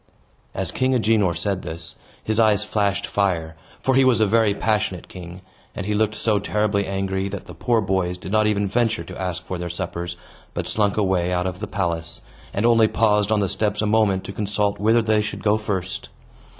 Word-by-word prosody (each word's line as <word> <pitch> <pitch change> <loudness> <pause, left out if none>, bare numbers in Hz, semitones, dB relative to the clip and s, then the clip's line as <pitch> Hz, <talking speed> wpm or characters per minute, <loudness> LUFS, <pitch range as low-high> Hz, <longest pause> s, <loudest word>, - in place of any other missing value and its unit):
As 95 -3 -2
King 130 0 +1
Agenor 110 -7 +2
said 95 +2 -1
this, 80 0 -6 0.3
his 110 +1 0
eyes 105 -2 +4
flashed 100 -2 0
fire 85 -5 0 0.3
(for 130 - +2
he 135 +1 +5
was 130 -3 +4
a 110 - +5
very 110 -1 +3
passionate 105 -5 -1
king), 90 0 -10 0.3
and 100 - -4
he 105 - 0
looked 110 0 +1
so 110 -2 +1
terribly 105 0 0
angry 95 0 -1
that 100 0 -6
the 90 - -10
poor 115 +8 +1
boys 95 -2 0
did 90 - -8
not 110 0 +3
even 105 -1 +1
venture 115 +2 +1
to 95 0 -8
ask 90 -1 -3
for 90 - -4
their 90 0 -4
suppers, 85 0 -4 0.4
but - - -2
slunk 105 -2 +1
away 95 -4 +1
out 90 0 0
of 90 -1 -3
the 105 - -4
palace, 85 -5 -2 0.3
and 100 - -1
only 115 -2 +5
paused 105 -2 +2
on 105 -1 +3
the 100 - +1
steps 105 +2 -1
a 105 - +1
moment 105 -3 +2
to 100 - -7
consult 105 0 -1
whither 110 +3 +3
they 110 -1 +3
should 105 - -5
go 105 +1 +3
first. 95 -4 -3
100 Hz, 205 wpm, -22 LUFS, 95-110 Hz, 0.4 s, he